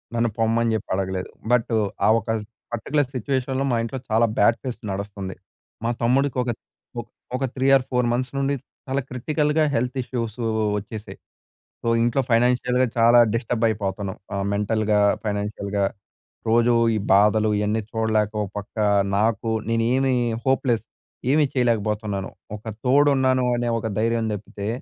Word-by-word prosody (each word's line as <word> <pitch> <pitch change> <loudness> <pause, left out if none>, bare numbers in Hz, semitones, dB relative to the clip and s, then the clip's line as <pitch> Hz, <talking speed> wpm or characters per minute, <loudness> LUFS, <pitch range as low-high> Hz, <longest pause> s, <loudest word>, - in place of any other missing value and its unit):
నన్ను 120 0 +2
పొమ్మని 115 0 +2
చెప్పి 110 - -5
అడగలేదు. 95 -1 -2 0.2
బట్టు, 120 -1 +2 0.3
ఆ - - +5
ఒక 115 - -10 0.4
పర్టిక్యులర్ 135 +4 0
సిట్యుయేషన్‌లో 130 +2 -1
మా 120 - +2
ఇంట్లో 125 +3 -4
చాలా 115 +1 +4
బ్యాడ్ 115 +3 +4
ఫేస్ 125 -3 -4
నడస్తుంది. 100 -1 -5 0.5
మా - - +2
తమ్ముడికి 130 +3 +2
ఒక 120 - -1 0.5
ఒ - - -1 0.3
ఒక 130 - -2
3 130 0 +1
ఆర్ 135 - +3
4 125 -1 +2
మంత్స్ 125 +1 -2
నుండి 140 +1 +1 0.3
చాలా 135 +1 0
క్రిటికల్‌గా 150 +4 0
హెల్త్ 125 +2 0
ఇష్యూసు 120 -2 -4 0.4
వచ్చేసాయి. 105 +1 -9 0.7
సో, - - -2
ఇంట్లో 120 +3 +2
ఫైనాన్షియల్‌గా 125 +2 +3
చాలా 115 +1 +6 0.2
డిస్టర్బ్ 115 0 -1
అయిపోతున్నాం. 100 -2 -3 0.2
ఆహ్, 100 0 -1
మెంటల్‌గా, 105 0 +1 0.2
ఫైనాన్షియల్‌గా. 100 -1 -2 0.6
రోజు 120 +1 +4 0.2
ఈ - - 0 0.2
బాధలు, 105 +2 +4
ఇయన్నీ 105 +2 0
చూడలేక 110 -2 +1
ఒక 100 - -4
పక్క 105 - -10 0.4
నాకు 110 +1 +1 0.2
నేనేమీ 125 +4 +2 0.3
హోప్‌లెస్. 130 -4 +1 0.5
ఏమీ 150 +2 +4
చేయలేకపోతున్నాను. 105 -5 0 0.3
ఒక 105 - -16 0.2
తోడున్నాను 130 -1 +4
అనే 120 0 -1
ఒక 115 - -4
ధైర్యం 115 +1 +1
తప్పితే, 100 0 -5
115 Hz, 140 wpm, -23 LUFS, 105-125 Hz, 0.7 s, చాలా